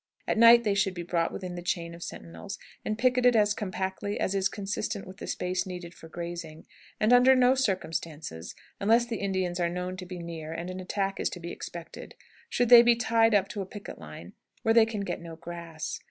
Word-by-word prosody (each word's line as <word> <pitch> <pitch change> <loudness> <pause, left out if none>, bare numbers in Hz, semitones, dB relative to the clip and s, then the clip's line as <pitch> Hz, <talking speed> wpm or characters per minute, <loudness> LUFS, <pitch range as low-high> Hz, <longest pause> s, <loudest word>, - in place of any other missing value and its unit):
At - - +1
night 235 +1 +8
they 210 -3 +2
should 195 -1 +1
be 175 - -4
brought 170 -1 0
within 185 -2 -6
the 175 - -6
chain 170 -1 -2
of 170 - -11
sentinels 195 +4 -8 0.3
and 215 - -2
picketed 250 0 +4
as 210 -1 +4
compactly 195 -1 -3
as 190 - 0
is 195 -1 +1
consistent 205 0 -4
with 190 0 -11
the - - -7
space 180 0 -2
needed 180 -2 -7
for 165 - -13
grazing, 170 -2 -7 0.3
and 215 +3 +4
under 250 +2 +7
no 255 0 +5
circumstances, 165 - -3 0.2
unless 230 +4 +4
the 235 -2 -4
Indians 185 -3 -1
are 170 -1 +1
known 180 +1 -4
to 185 -1 -8
be 180 0 -7
near 165 -2 -6
and 170 +2 -5
an 185 - -6
attack 195 +1 -2
is - - 0
to 180 - -8
be 170 0 -6
expected, 170 -1 -9 0.3
should 245 -2 +1
they 240 -1 +11
be 240 0 +5
tied 225 -1 +3
up 195 -1 +3
to 205 - -4
a - - -4
picket 205 +1 -9
line - - -10 0.3
where 225 - +3
they 225 -1 +6
can 215 -3 -3
get 200 - -4
no 165 -1 -8
grass. 165 -1 -6
190 Hz, 215 wpm, -28 LUFS, 170-220 Hz, 0.3 s, they